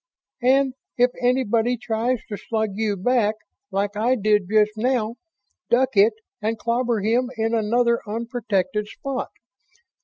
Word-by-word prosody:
And 265 +1 +3 0.2
it 245 0 +4
anybody 245 -1 +2
tries 235 +1 -1
to 210 - -3
slug 220 0 -2
you 210 0 -1
back, 220 +1 +2 0.3
like 200 +1 -1
I 235 +5 +2
did 210 -4 +1
just 215 -1 +4
now, 235 0 0 0.5
duck 255 +1 +2
it 205 +3 +6 0.3
and 220 +2 -1
clobber 235 0 0
him 240 +4 +1
in 225 +1 0
another 235 +2 +2
unprotected 210 -3 -2
spot. 270 +4 -4
225 Hz, 130 wpm, -23 LUFS, 210-245 Hz, 0.5 s, it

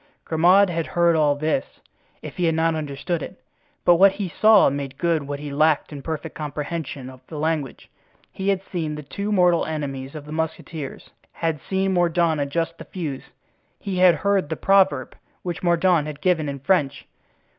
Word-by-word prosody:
Grimaud 180 +4 +4
had 165 -1 -2
heard 170 -1 +4
all 150 -2 +3
this, 155 - -2 0.4
if - - -8
he 180 - +1
had 165 -1 +2
not 165 0 +2
understood 155 +2 -3
it. - - -8 0.5
But 175 -1 +6
what 195 +2 +6
he 195 -2 -4
saw 210 0 +5
made 140 -1 -5
good 165 -5 0
what 145 0 -4
he 145 -1 -6
lacked 155 +1 +2
in 140 - -7
perfect 160 +1 -5
comprehension 150 -2 -5
of 130 -1 -12
the 155 - -8
language. 150 -3 -2 0.4
He 195 +1 -3
had 195 -1 0
seen 160 -5 -4
the 150 - -7
two 200 +9 -4
mortal 180 -4 +3
enemies 140 -3 -5
of 150 -1 -8
the 150 - -10
musketeers, 160 -2 -5 0.2
had 165 -2 -2
seen 190 0 +1
Mordaunt 170 -3 +2
adjust 165 +4 -2
the - - -9
fuse; 155 -8 -5 0.5
he 195 -2 -4
had 180 -2 +6
heard 200 -6 0
the 160 - -2
proverb, 195 +2 +2 0.3
which 175 -2 -4
Mordaunt 170 -2 +2
had 150 -1 -7
given 165 -5 +1
in 140 - -4
French. 145 -3 0
160 Hz, 180 wpm, -23 LUFS, 150-180 Hz, 0.5 s, But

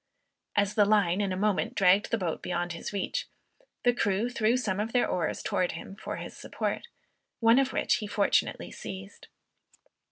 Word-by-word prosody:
As 205 0 +2
the 210 -1 +5
line 200 -3 +3
in 200 -2 0
a 185 - -2
moment 205 0 0
dragged 195 +2 +4
the 230 - +1
boat 175 -6 -2
beyond 175 0 -2
his 170 - -6
reach, 205 - -2 0.6
the 245 - +4
crew 210 +1 0
threw 230 +1 +2
some 205 -6 -1
of 220 +2 -2
their 245 - +3
oars 170 -3 -1
towards 180 -2 0
him 190 +3 -8
for - - -5
his - - -7
support, - - -3 0.5
one 230 +2 +6
of 270 -1 +1
which - - +2
he 210 - -5
fortunately 205 -1 +1
seized. 195 +1 -9
205 Hz, 180 wpm, -29 LUFS, 185-225 Hz, 0.6 s, one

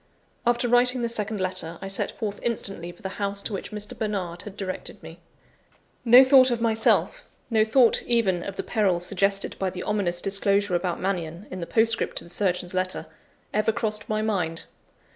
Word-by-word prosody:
After 240 0 +2
writing 245 +1 +3
this 235 0 -1
second 215 -1 -2
letter, 185 -3 -1
I 195 - -7
set 195 - 0
forth 205 -3 -4
instantly 195 -7 -3
for 175 - -20
the 190 0 -6
house 200 0 -1
to 220 - -4
which 195 - -5
Mr. 210 -1 -4
Bernard 190 -5 -3
had 205 -1 -10
directed 185 -2 -6
me. - - -11 0.8
No 245 +2 +8
thought 260 -1 +6
of 240 -1 -1
myself; 230 - +1 0.2
no 220 -1 +4
thought, 235 +2 +4
even, 210 -7 +2
of 195 +2 -6
the - - -4
peril 200 -6 +1
suggested 195 +2 0
by 190 - 0
the 180 0 -6
ominous 195 -5 -1
disclosure 200 0 +1
about 175 0 -1
Mannion, 180 -1 -3
in 185 - -6
the 170 - -5
postscript 230 0 +1
to - - -3
the 170 - -9
surgeon's 180 -1 0
letter, 185 0 -2 0.5
ever 215 +1 +2
crossed 215 -1 -2
my 215 0 0
mind. 180 -7 -1
200 Hz, 185 wpm, -25 LUFS, 185-225 Hz, 0.8 s, No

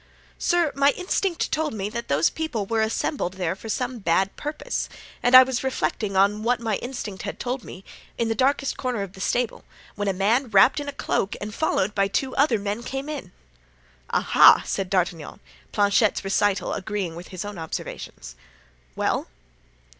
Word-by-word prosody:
"Sir, 345 -4 +2
my 280 +1 +4
instinct 365 -1 -1
told 310 -5 -1
me 200 -1 -2
that 235 +2 -5
those 140 +3 +2
people 285 -11 -3
were 225 +2 0
assembled 220 - -1
there 185 -1 -1
for 220 +3 -10
some 250 +2 -2
bad 190 +1 +1
purpose; 305 +12 -4 0.3
and 245 +1 +4
I 255 - +12
was 255 -1 -2
reflecting 215 -6 -1
on 200 +2 +3
what 240 +1 +1
my 225 -4 -1
instinct 225 -6 -6
had - - -6
told 250 -1 -3
me, 185 - -10 0.3
in 230 - 0
the 225 - +1
darkest 275 +3 +1
corner 250 -6 -2
of 195 -2 -8
the 190 - -10
stable, 240 +3 -1 0.3
when 205 -1 -3
a - - +3
man 220 +7 +1
wrapped 210 +8 +5
in 285 0 -4
a - - -3
cloak 200 -7 -1
and 210 +1 -6
followed 210 -9 0
by 200 -1 +2
two 260 +6 -2
other 275 -4 +3
men, 205 +2 -3
came 270 +3 -5
in." 275 -12 -6 0.8
"Ah - - -1
ah!" - - +8
said 195 -2 -2
D'Artagnan, 175 -5 -1 0.3
Planchet's 205 0 +2
recital 195 +1 +1
agreeing 195 -4 -3
with 175 +1 -9
his 185 +1 -6
own 205 -3 -7
observations. 155 - -7 0.6
"Well?" - - 0
215 Hz, 180 wpm, -24 LUFS, 195-260 Hz, 0.8 s, I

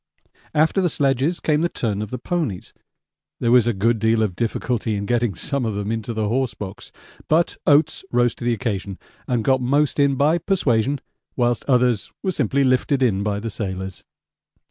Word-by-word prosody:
After 160 +5 +3
the 180 - +2
sledges 140 +3 +1
came 150 -1 +1
the 170 - +1
turn 105 -8 -2
of 105 - -4
the 125 - -4
ponies 130 - -3 0.7
there 115 - +1
was 120 -2 +5
a - - +3
good 115 +2 +1
deal 110 +1 +2
of 100 -5 -2
difficulty 115 0 -1
in 100 0 -3
getting 120 -3 0
some 140 - -1
of 110 -3 -2
them 105 +1 -3
into 115 0 -3
the 110 -2 -1
horse 125 +2 -1
box, 100 -1 -8 0.4
but 165 +2 +2
Oates 145 +4 +3
rose 120 -1 +2
to - - -10
the 120 0 +2
occasion 100 -5 -3 0.3
and 120 -3 0
got 130 +2 +2
most 140 +4 +1
in 140 -1 +3
by 150 +5 +2
persuasion, 140 - +1 0.3
whilst 120 -2 +1
others 125 -5 +2
were 190 - 0
simply 140 - +1
lifted 130 +1 +2
in 100 -6 +2
by 100 0 -1
the 115 +1 -5
sailors. 95 -2 -5
120 Hz, 190 wpm, -22 LUFS, 110-140 Hz, 0.7 s, was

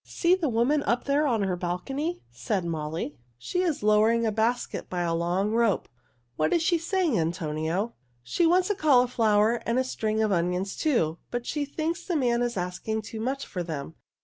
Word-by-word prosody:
"See 345 0 +1
the 355 -6 +1
woman 245 +6 +2
up 240 -3 0
there 285 +2 +2
on 225 -6 +1
her 190 -2 0
balcony," 270 - -3
said 150 - -2
Molly. 155 -2 -4 0.2
"She 360 - -2
is 330 - -1
lowering 215 +2 +4
a 220 - +1
basket 225 +3 -1
by 180 -1 -2
a 170 -1 0
long 175 +5 0
rope. 230 -3 +2 0.5
What 155 0 +1
is 335 - +2
she 340 0 +2
saying, 335 - +1
Antonio?" 165 +5 -1 0.3
"She 335 - +1
wants 365 +4 +3
a - - 0
cauliflower 240 - +3
and 230 +2 0
a 260 - +3
string 220 -4 -1
of 215 - +1
onions, 180 +2 0
too, 175 - +1
but 245 0 -3
she 295 -1 -2
thinks 315 +4 -3
the 350 - -2
man 240 -5 +2
is 240 -3 -1
asking 180 +5 -3
too 220 +1 -7
much 265 +5 -2
for 180 - -5
them. 160 -3 -5
225 Hz, 190 wpm, -27 LUFS, 180-280 Hz, 0.5 s, lowering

